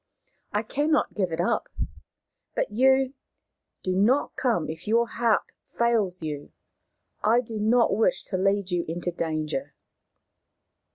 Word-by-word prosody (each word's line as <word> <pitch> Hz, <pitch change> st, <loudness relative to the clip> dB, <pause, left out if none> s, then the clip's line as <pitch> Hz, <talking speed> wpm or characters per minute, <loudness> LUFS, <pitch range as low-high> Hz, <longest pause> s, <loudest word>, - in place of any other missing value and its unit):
I 210 Hz, +2 st, 0 dB
cannot 295 Hz, +7 st, +1 dB
give 185 Hz, -5 st, -1 dB
it 160 Hz, -, -3 dB
up. 185 Hz, -, 0 dB, 0.9 s
But -, -, 0 dB
you 265 Hz, +3 st, +4 dB, 0.3 s
— -, -, -57 dB
do 185 Hz, -1 st, 0 dB
not 235 Hz, +9 st, +2 dB
come 230 Hz, -11 st, +1 dB
if 160 Hz, +4 st, -7 dB
your 235 Hz, +2 st, +3 dB
heart 230 Hz, -2 st, +2 dB, 0.3 s
fails 215 Hz, -7 st, +1 dB
you. 150 Hz, -2 st, -5 dB, 0.7 s
I 230 Hz, +3 st, +5 dB
do 225 Hz, -3 st, -6 dB
not 230 Hz, +1 st, +3 dB
wish 220 Hz, -, +2 dB
to 195 Hz, -, -5 dB
lead 195 Hz, 0 st, +1 dB
you 175 Hz, -1 st, +1 dB
into 175 Hz, +2 st, -2 dB
danger." 160 Hz, -, -3 dB
210 Hz, 135 wpm, -26 LUFS, 175-235 Hz, 0.9 s, I